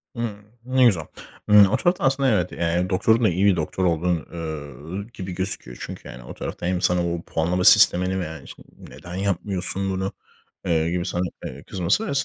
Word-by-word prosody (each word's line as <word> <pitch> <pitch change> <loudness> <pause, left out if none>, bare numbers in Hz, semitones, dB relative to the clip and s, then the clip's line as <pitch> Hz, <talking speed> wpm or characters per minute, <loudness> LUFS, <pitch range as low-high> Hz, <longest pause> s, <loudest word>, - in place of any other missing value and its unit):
Imm. 110 -3 -4 0.2
Ne 130 0 +3
güzel. 95 -9 +3 0.5
Imm, 105 -1 +9
o 100 - +1
tarafta 175 +1 +1
aslında, 135 0 +3
evet, 90 -6 +1
eee, - - -9
yani 85 +2 0
doktorun 110 +6 +3
da 110 - +5
iyi 90 +3 +1
bir 100 -2 +5
doktor 95 +2 -2
olduğu, 85 -1 0
üüü, 80 - -6
gibi 95 0 -6
gözüküyor. 90 -10 -5
Çünkü - - -8
yani 60 0 -10
o - - -9
tarafta - - -6
hem 90 0 0
sana 90 -1 +2
o 85 - -4
puanlama 85 +2 -1
sistemini 95 -2 +5
veya, 80 -3 -5
işte, - - -13
"Neden 90 +1 -10
yapmıyorsun 95 0 -2
bunu!" 95 0 -2 0.5
eee, 80 -1 +1
gibi 90 0 -1
sana, 90 - -1 0.2
eee, 65 +2 -8
kızması 95 - 0
ve - - -2
90 Hz, 190 wpm, -23 LUFS, 85-100 Hz, 0.5 s, Imm